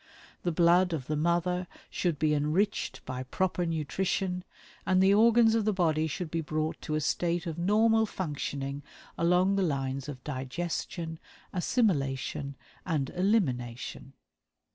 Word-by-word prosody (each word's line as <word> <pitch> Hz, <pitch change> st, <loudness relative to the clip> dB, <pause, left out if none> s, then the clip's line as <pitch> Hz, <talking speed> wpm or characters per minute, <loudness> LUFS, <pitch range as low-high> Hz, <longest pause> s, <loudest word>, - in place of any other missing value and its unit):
The 175 Hz, -, 0 dB
blood 175 Hz, +2 st, +4 dB
of 140 Hz, -6 st, -3 dB
the 155 Hz, -, -1 dB
mother 175 Hz, +3 st, +1 dB, 0.2 s
should 170 Hz, -4 st, 0 dB
be 150 Hz, +1 st, +2 dB
enriched 155 Hz, +8 st, 0 dB
by 130 Hz, 0 st, -4 dB
proper 175 Hz, +6 st, -1 dB
nutrition, 180 Hz, +3 st, -1 dB, 0.4 s
and 185 Hz, -1 st, +3 dB
the 190 Hz, +1 st, +5 dB
organs 225 Hz, +1 st, +5 dB
of 225 Hz, -1 st, +2 dB
the 215 Hz, 0 st, +1 dB
body 160 Hz, -4 st, +2 dB
should 160 Hz, +1 st, -4 dB
be 165 Hz, -, 0 dB
brought 155 Hz, 0 st, -2 dB
to 155 Hz, -, -2 dB
a -, -, +1 dB
state 170 Hz, +3 st, 0 dB
of 165 Hz, -1 st, -4 dB
normal 220 Hz, +4 st, +3 dB
functioning 145 Hz, -6 st, -4 dB, 0.3 s
along 180 Hz, +3 st, +3 dB
the -, -, +2 dB
lines 140 Hz, -4 st, -1 dB
of 130 Hz, -3 st, -8 dB
digestion, 160 Hz, +4 st, -4 dB, 0.3 s
assimilation, 145 Hz, -, 0 dB, 0.3 s
and 150 Hz, -6 st, -1 dB
elimination. 135 Hz, -, -1 dB
170 Hz, 140 wpm, -29 LUFS, 145-185 Hz, 0.4 s, the